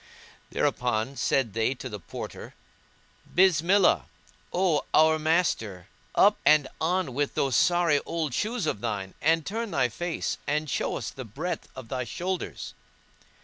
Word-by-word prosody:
Thereupon 125 +1 0
said 130 -5 +1
they 115 +4 +1
to 130 - -7
the 105 -4 -6
Porter, 80 - -8 0.8
"Bismillah,[FN#164] 185 +2 +4 0.5
O 180 -5 +2
our 155 0 +5
master, 155 - 0 0.3
up - - +5
and 150 -3 +5
on 175 -4 0
with 145 +2 -1
those 135 -4 +1
sorry 175 0 +4
old 160 -5 -3
shoes 215 - -1
of 105 -9 -2
thine 95 -2 -3
and 160 0 +2
turn 225 +2 -3
thy 130 -8 +1
face 175 +8 -3
and 150 +1 0
show - - -1
us - - -5
the 130 - -7
breadth 160 - -5
of 130 -3 -9
thy 130 -1 -2
shoulders!" 180 +7 -4
155 Hz, 145 wpm, -27 LUFS, 125-175 Hz, 0.8 s, our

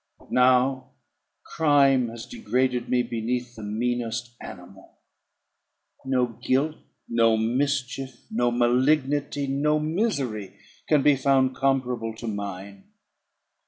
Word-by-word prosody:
But - - -21
now 130 +1 +3 0.5
crime 140 -5 +3
has 115 0 -8
degraded 125 +2 -1
me 125 -1 +2
beneath 120 +1 -3
the 110 - -9
meanest 120 +2 -2
animal. 95 +2 -12 1.1
No 130 -2 +1 0.2
guilt, 140 +6 +1 0.3
no 115 -1 +3
mischief, 130 +2 -2
no 120 +2 +1
malignity, 135 +4 +1
no 145 +3 +1
misery, 150 - -2 0.3
can 150 -3 +4
be 145 -1 +5
found 135 -1 +2
comparable 125 -4 -1
to 115 - -9
mine. 100 -2 -6
125 Hz, 105 wpm, -25 LUFS, 115-135 Hz, 1.1 s, be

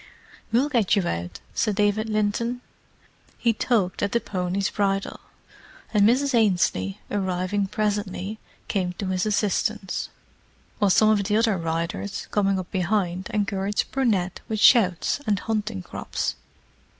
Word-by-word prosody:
"We'll 245 +5 +3
get 230 -8 +2
you 195 -4 +1
out," 85 +2 -4
said 215 -3 0
David 210 +2 +1
Linton. 215 +3 0 0.8
He 230 -2 +2
tugged 215 -5 0
at 200 - 0
the 235 - +3
pony's 185 -1 -2
bridle; 195 -1 -1 0.7
and 210 0 +5
Mrs. 275 +3 +2
Ainslie, 175 - +2
arriving 190 0 -1
presently, 205 0 -2 0.3
came 185 -3 -1
to 190 +1 -4
his 185 +2 0
assistance, 210 -1 -1 0.7
while 205 -2 +3
some 215 +3 +5
of 205 -2 +2
the 210 +1 +2
other 225 -2 +3
riders, 170 +3 -3
coming 195 -2 +2
up 185 -1 -5
behind, 185 -1 -1
encouraged 200 -1 -1
Brunette 205 -9 0
with 215 -1 -2
shouts 205 - +4
and 205 -2 +2
hunting 210 - -2
crops. - - -3
205 Hz, 135 wpm, -24 LUFS, 185-215 Hz, 0.8 s, and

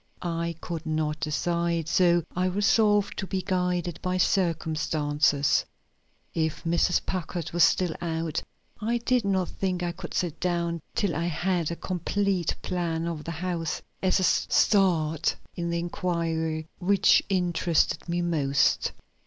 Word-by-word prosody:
I 170 -1 -2
could 165 -1 -5
not 155 -1 -1
decide, 170 +1 -1
so 175 0 +3
I 180 +1 +1
resolved 205 +2 +3
to 195 - -3
be 190 -1 -2
guided 180 -2 -1
by 185 0 -1
circumstances. 155 -5 +1 0.7
If 160 -1 -1
Mrs. 170 +1 +2
Packard 175 -2 -3
were 175 - -2
still 175 0 +4
out, 165 -2 -2 0.4
I 230 +3 +1
did 245 0 +1
not 190 -3 +1
think 185 -2 -2
I 175 - -1
could 175 0 -8
sit 175 -4 -1
down 170 -1 -1 0.2
till 200 -8 0
I 165 +2 -1
had 175 0 0
a 170 - -3
complete 185 0 -1
plan 170 -2 -1
of 160 -3 -4
the 170 - -3
house 165 -1 -2 0.2
as 190 0 +2
a - - 0
start 165 -6 +3 0.2
in 170 -1 -2
the 170 - 0
inquiry 165 -2 -2
which 195 +2 +4
interested 175 -3 +1
me 175 +1 0
most. 145 -5 +2
170 Hz, 140 wpm, -27 LUFS, 165-185 Hz, 0.7 s, still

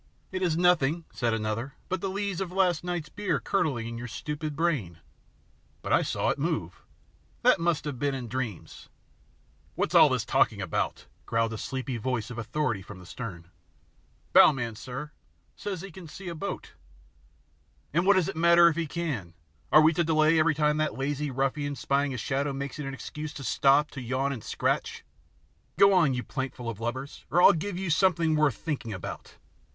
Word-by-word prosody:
"It 185 0 -3
is 170 -3 +1
nothing," 170 -2 +3
said 120 -2 0
another, 110 +5 -2
"but 185 -1 -2
the 195 - -1
lees 200 -1 -2
of 185 -2 -3
last 180 -3 +2
night's 175 -3 -3
beer 205 +3 -1
curdling 135 -12 -1
in 115 0 -6
your 125 - -5
stupid 150 +4 -5
brain." 140 - -1 0.9
"But - - -1
I - - +5
saw - - -1
it - - -1
move." - - -2 0.6
"That - - +5
must 165 -2 0
have 140 -5 -4
been 140 -1 0
in 125 -3 -5
dreams." 120 -6 -5 0.9
"What - - -1
is - - -7
all - - +8
that - - 0
talking - - +2
about?" - - -2 0.2
growled 115 0 0
a - - -4
sleepy 130 -2 -4
voice 120 0 -2
of 120 - -6
authority 120 -2 -1
from 95 +1 -11
the 90 - -13
stern. 90 -6 -8 0.8
"Bow - - +9
man, 120 -5 -4
sir, 135 +6 -7 0.4
says 195 -4 -5
he 195 0 -8
can 175 0 -11
see 185 +4 -8
a - - -4
boat." 190 +4 -6 1.2
"And 170 +3 +3
what 200 +2 +5
does 185 -4 +2
it - - -4
matter 170 +1 +6
if 165 - -3
he 165 -2 -1
can? 135 - -4 0.4
Are 155 - +8
we 160 +2 +5
to 170 - +1
delay 155 0 +3
every 155 0 +3
time 150 0 +2
that 155 -3 -1
lazy 145 +2 -2
ruffian 135 +2 -1
spying 140 +1 0
a 130 - -4
shadow 140 +4 -1
makes 140 +1 -5
it 145 - -4
an 135 - -4
excuse 150 +2 -7
to 140 - -7
stop 135 +5 +3
to 130 - -7
yawn 130 +3 -1
and 125 -6 -6
scratch? - - -1 0.7
Go 200 0 +7
on, 160 -8 +4
you 125 - -3
plankful 130 -3 -4
of 110 - -10
lubbers, 130 +5 -5
or 175 - +2
I'll - - +8
give 180 +3 -3
you 190 -2 -2
something 165 -2 +3
worth 150 -6 +3
thinking 140 -8 -4
about!" 95 - -7
145 Hz, 195 wpm, -28 LUFS, 125-170 Hz, 1.2 s, Bow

